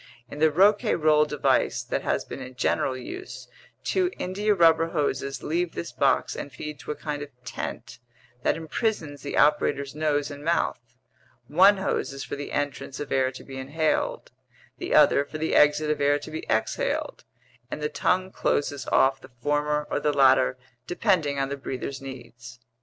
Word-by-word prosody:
In 150 - -7
the 160 +1 +5
Rouquayrol 160 -4 +4
device 150 -1 +1
that - - -2
has - - -1
been - - -8
in 130 0 -9
general 130 +1 0
use, 370 - -8 0.4
two 370 -1 +1
india 205 +3 0
rubber 165 -2 +5
hoses 140 -4 -2
leave 170 +2 -1
this 85 - -5
box - - +1
and 140 - -6
feed 145 +2 -7
to - - -12
a 150 - -1
kind 145 -1 -4
of 145 - -6 0.2
tent 120 - -6 0.4
that - - +2
imprisons 160 - -2
the 145 - -4
operator's 140 -2 +2
nose 150 -1 0
and 145 0 -9
mouth; 135 -8 -1 0.5
one 190 +6 +6
hose 190 -7 -2
is 135 0 -6
for - - -5
the 145 0 -6
entrance 140 -2 -3
of 145 - -6
air 130 -1 +2
to 130 - -11
be 135 -1 -8
inhaled, 150 +4 -1 0.5
the - - -1
other 140 - +6
for 150 +2 -8
the 160 +1 -1
exit 150 +1 +4
of 150 -1 -2
air 145 0 +4
to 145 +2 -9
be 160 - -6
exhaled, 110 0 -1 0.5
and - - -5
the 150 - -1
tongue 185 +5 0
closes 145 -6 -1
off 135 0 +3
the 130 - -13
former 150 +2 0
or - - +1
the 150 - +1
latter 130 -2 +4 0.3
depending 175 -7 +1
on 135 0 0
the 140 - -4
breather's 135 0 -5
needs. 125 -1 -10
145 Hz, 175 wpm, -26 LUFS, 135-160 Hz, 0.5 s, one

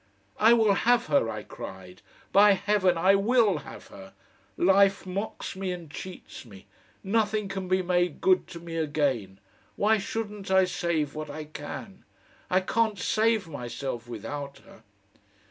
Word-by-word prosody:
"I 225 +2 +6
will 220 -3 +4
have 240 +4 +2
her," 140 -7 +2
I 110 - -5
cried. 95 -1 -10 0.3
"By 205 +1 +7
Heaven! 190 -2 +1
I 185 +4 +4
WILL 205 -3 +3
have 140 - -12
her! 95 0 -13 0.4
Life 195 +2 +4
mocks 195 +2 -5
me 190 -1 -3
and 170 -4 -7
cheats 185 +4 -9
me. 100 -5 -14 0.4
Nothing 210 0 0
can 190 -1 -5
be 185 0 +1
made 175 -2 0
good 185 -1 +3
to 170 - -9
me 165 -1 -7
again.... 140 -11 -1 0.4
Why 215 +1 +3
shouldn't 205 -1 -5
I 190 0 +5
save 170 -5 -1
what 155 -1 -6
I 155 +2 -6
can? 155 +6 -9 0.5
I 185 +1 +3
can't 220 +2 0
save 215 +1 +1
myself 120 -3 -5
without 140 +5 -6
her...." - - -17
185 Hz, 150 wpm, -27 LUFS, 145-200 Hz, 0.5 s, By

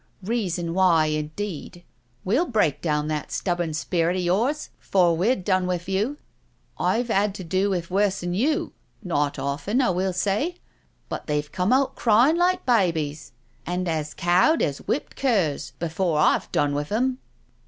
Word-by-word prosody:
"Reason 180 -6 -2
why, 175 -4 +4
indeed 155 +3 -4
I - - -39 0.4
We'll 255 - +2
break 210 - +1
down 150 -2 0
that 150 -1 -3
stubborn 175 -4 -1
spirit 170 +2 0
of 185 - -1
yours 230 +13 0
'fore 175 -3 +2
we've 190 +4 +1
done 185 -1 +1
with 180 -1 -2
you 210 +9 -1 0.3
— - - -40 0.2
I've 240 +1 +1
had 200 -1 +1
to 190 - -6
do 185 +4 0
with 175 -3 -2
worse'n 190 -2 0
you, 285 - 0 0.3
not 145 -6 0
often, 150 - -1
I 250 -8 +3
will 185 +1 0
say, 205 - 0 0.5
but - - -6
they've 150 0 -2
come 185 +4 0
out 265 +1 +2
cryin' 240 +7 +4
like 360 +1 +1
babies, 165 - 0 0.3
and 180 +1 -2
as 155 -2 -2
cowed 180 - +3
as 140 -1 -1
whipped 280 - -2
curs 185 - 0
before 170 0 -1
I've 150 - +2
done 145 -1 +1
with 145 +3 -3
'em.' 255 +4 0
185 Hz, 165 wpm, -24 LUFS, 165-215 Hz, 0.5 s, why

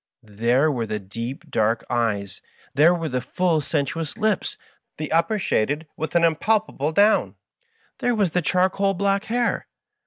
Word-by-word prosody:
There 120 +8 +1
were 120 -5 -2
the 105 0 -2
deep, 115 +7 -7
dark 110 +1 +1
eyes, 105 -5 -1 0.3
there 150 +5 +6
were 165 -2 -3
the 125 -3 -2
full, 165 +4 0
sensuous 150 +1 -2
lips, 215 -3 0 0.4
the 155 -1 -5
upper 165 +7 +2
shaded 150 - 0
with 160 +2 -5
an 170 - +4
impalpable 165 -2 +1
down, 205 +6 +3 0.6
there 245 -1 +1
was 200 -6 +1
the 180 - +1
charcoal 190 +3 +1
black 200 +2 0
hair 240 +1 -1
160 Hz, 150 wpm, -23 LUFS, 120-195 Hz, 0.6 s, there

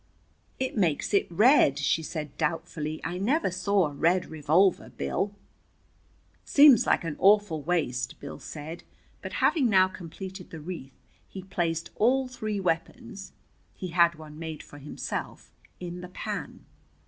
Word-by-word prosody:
"It 260 0 -2
makes 180 -3 0
it 200 - +3
red," 205 - +5
she 145 +3 +1
said 155 -2 -6
doubtfully. 155 -1 -2
"I 175 +4 -3
never 250 - +1
saw 185 +1 +2
a 145 - -8
red 175 +5 +2
revolver, 160 +5 +2
Bill." 70 - -2 1.1
"Seems 280 -4 +6
like - - +3
an 165 -3 -3
awful 200 -5 +4
waste," 140 -7 -1
Bill - - -8
said. 155 +2 -8 0.4
But - - -7
having 300 -7 +3
now 190 -2 +5
completed 185 +1 -9
the 165 - -8
wreath 150 -5 -8 0.3
he 190 - -8
placed 170 -3 -2
all 255 +4 +3
three 215 -5 -4
weapons 195 +5 -3 0.4
he 185 - -6
had 170 -1 +3
made 155 0 -8
one - - -19
for 145 - -12
himself 145 +1 -6 0.3
in 175 0 -6
the 180 - -8
pan. 180 - -6
175 Hz, 145 wpm, -27 LUFS, 155-200 Hz, 1.1 s, Seems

